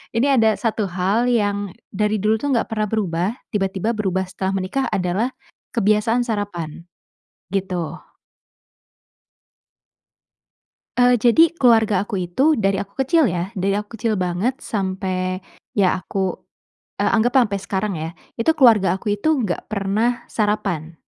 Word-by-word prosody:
ini 240 +5 +3
ada 225 -5 +4
1 220 -3 -1
hal 190 +6 0
yang 205 -5 0 0.2
dari 210 +2 0
dulu 215 +1 +2
tuh 285 -2 -1
enggak 230 - 0
pernah 215 -1 0
berubah, 190 -4 0 0.2
tiba-tiba 195 +1 -1
berubah 190 -3 0
setelah 190 0 -2
menikah 260 +9 -1
adalah 195 +8 0 0.4
kebiasaan 220 +2 +2
sarapan, 180 -8 -4 0.7
gitu. 185 -4 -3 3.0
Eee, 245 0 +5
jadi 320 +8 +5
keluarga 225 - +4
aku 200 -1 -4
itu, 275 - +2
dari 195 -2 +1
aku 200 +3 -11
kecil 305 -2 +4
ya, 180 +4 -3
dari 195 0 0
aku 210 +2 -6
kecil 225 -2 -1
banget 185 +8 -1
sampai 185 -2 -2 0.4
ya 190 -3 +4
aku 190 0 -2 0.6
e - - 0
anggaplah 245 +3 +3
sampai 200 -2 -3
sekarang 195 +1 -2
ya, 160 +1 -3 0.3
itu 230 - -1
keluarga 210 - +5
aku 205 +2 -2
itu 205 +8 -1 0.2
enggak 180 -4 -3
pernah 215 +4 0
sarapan. 195 -7 -1
205 Hz, 135 wpm, -21 LUFS, 190-230 Hz, 3.0 s, Eee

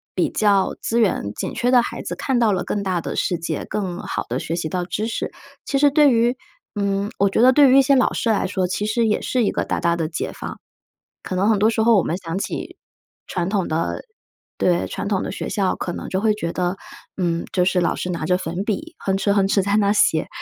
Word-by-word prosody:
比 - - +1
较 200 -3 +2
资 235 - 0
源 185 - +1
紧 - - -4
缺 245 +1 0
的 250 -1 +6
孩 - - -5
子， - - -5
看 265 -3 0
到 230 -3 +3
了 185 -2 0
更 205 - -2
大 185 -2 0
的 - - -5
世 175 - 0
界， 165 -2 -4
更 185 -4 -3
好 - - -3
地 125 +2 -2
学 165 - -3
习 170 -2 -2
到 180 +2 -2
知 210 +4 -3
识。 225 - -3 0.3
其 275 - 0
实 290 +1 +5
对 295 0 +5
于 235 +1 +2 0.4
嗯， 200 0 -1
我 200 0 +3
觉 195 - +1
得 255 +2 +7
对 285 0 +6
于 265 - +6
一 - - +8
些 275 +1 +3
老 255 - +3
师 230 - -1
来 215 -3 +2
说， 185 -1 -1
其 180 +3 -2
实 225 +2 +1
也 210 - +1
是 250 -2 0
一 - - +1
个 - - -1
大 - - -2
大 170 -1 +1
的 165 -2 -2
解 165 - -3
放。 - - -7 0.6
可 185 - -5
能 190 +3 +2
很 215 -2 +3
多 215 +2 +4
时 225 -1 0
候 230 0 +5
我 190 - +4
们 170 - -2
想 175 -1 -5
起 - - -5 0.5
传 175 0 -2
统 195 -3 0
的 160 +1 -2 0.5
对， 175 -1 +1
传 - - -5
统 200 -2 0
的 - - -4
学 - - -5
校， 195 -3 0
可 175 - -4
能 - - -6
就 190 - -1
会 215 +1 +2
觉 170 -5 -3
得， 180 +1 -1 0.4
嗯， 170 -3 -1
就 180 - +3
是 180 0 +2
老 175 - +1
师 180 - -4
拿 170 -3 -3
着 180 +3 +2
粉 180 +1 -4
笔， 310 - -4
哼 195 - -1
哧， 200 +1 +1
哼 195 -1 +3
哧 195 0 +2
在 200 +2 +1
那 205 -1 +3
写。 160 -6 +2
200 Hz, 275 characters per minute, -21 LUFS, 180-220 Hz, 0.6 s, 一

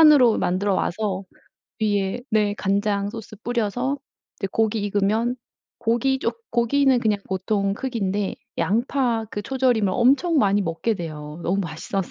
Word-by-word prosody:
산으로 290 -7 +7
만들어와서 195 +1 0 0.6
위에 205 0 0
네. 210 -1 +2
간장 200 0 +1
소스 225 -1 -8
뿌려서 245 +3 -1 0.4
이제 - - -2
고기 220 0 +1
익으면 210 +4 +1 0.4
고기 240 +3 +1
쪼 - - 0 0.2
고기는 260 +2 +3
그냥 215 -3 +1
보통 195 +1 0
크기인데 205 -4 -2 0.2
양파 235 +1 +1
그 205 - -3
초절임을 245 -2 +1
엄청 280 +7 +3
많이 205 -6 +4
먹게 170 +4 -1
돼요. 155 -3 -7
너무 195 +3 +1
맛있어서. 175 +2 -3
215 Hz, 295 characters per minute, -23 LUFS, 195-240 Hz, 0.6 s, 산으로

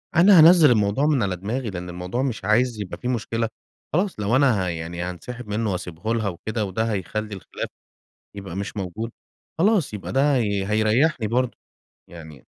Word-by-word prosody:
أنا 180 +1 +7
هانزِّل 160 -3 +8
الموضوع 105 +5 +2
من 145 -7 +2
على 95 -2 -1
دماغي، 110 +6 -3
لإن 90 -1 -6
الموضوع 90 +8 -3
مش 120 -8 -3
عايز 115 +2 +2
يبقى 95 - -6
في 125 - -5
مشكلة، 115 -2 -1 0.4
خلاص 180 - 0
لو 105 +5 +1
أنا 125 -9 +3
ه - - -2
يعني 85 +1 -5
هانسحب 110 +7 -6
منه 105 0 -1
واسيبه 90 +4 -3
لها 110 -3 0
وكده، 110 +5 -3
وده 110 +4 -1
هيخلّي 105 +2 -3
الخلاف 95 - -6 0.7
يبقى 95 -3 -7
مش 100 +2 -5
موجود، 105 +5 -4 0.5
خلاص 185 - +2
يبقى 100 - -6
ده 140 +2 +3
هي 100 -4 0
هيريّحني 110 +4 +2
برضه، 125 +1 0 0.5
يعني 80 -5 -12
110 Hz, 170 wpm, -23 LUFS, 95-125 Hz, 0.7 s, هانزِّل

